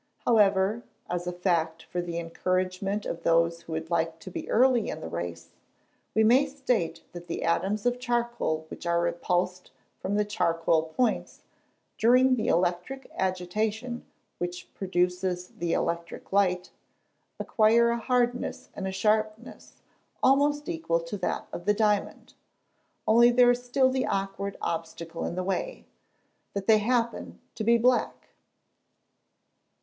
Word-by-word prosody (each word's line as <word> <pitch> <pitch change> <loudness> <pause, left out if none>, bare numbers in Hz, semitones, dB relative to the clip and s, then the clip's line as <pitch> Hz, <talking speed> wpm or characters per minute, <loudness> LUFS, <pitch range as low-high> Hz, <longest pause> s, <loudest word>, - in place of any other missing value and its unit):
However, 210 0 +3 0.3
as 175 0 -2
a - - 0
fact 170 -3 0
for 175 - -3
the 170 -1 -5
encouragement 185 +4 -1
of 170 - -4
those 170 0 +2
who 165 - -8
would 160 +1 -4
like 165 -1 0
to 185 - -9
be - - -6
early 250 -1 +3
in - - -4
the - - -6
race, 85 0 -6 0.6
we 220 - +4
may 255 +6 +5
state 260 - -1
that 175 0 -9
the 165 - -4
atoms 195 +6 0
of 245 0 +1
charcoal 240 -10 -1
which - - -8
are 170 0 +2
repulsed 175 +1 -1 0.3
from 195 +2 -2
the 210 0 +2
charcoal 165 -5 +1
points, 250 -3 0 0.6
during 255 +3 +5
the 225 -2 -2
electric 180 +10 -1
agitation 210 +6 -2 0.4
which 175 +1 -5
produces 180 -1 -1
the 170 -1 -3
electric 170 +2 -3
light, 180 -3 +2 0.7
acquire 230 +2 +4
a 235 - -1
hardness 245 0 -1
and 190 - -4
a - - -2
sharpness 215 +3 -2 0.4
almost 290 +2 +3
equal 325 - 0
to 165 +4 -6
that 180 - -2
of 175 - -6
the 210 0 +3
diamond 210 -1 0 0.7
only 235 +2 +6
there 245 0 +6
is 245 0 -2
still 260 +1 +2
the 260 0 0
awkward 195 0 -2
obstacle 165 0 -4
in - - -3
the 185 - -2
way, - - -3 0.7
that 200 -1 -2
they 220 0 +6
happen 235 +1 -1
to 220 - -4
be 235 +2 +5
black. 245 +2 +1
195 Hz, 145 wpm, -27 LUFS, 175-235 Hz, 0.7 s, only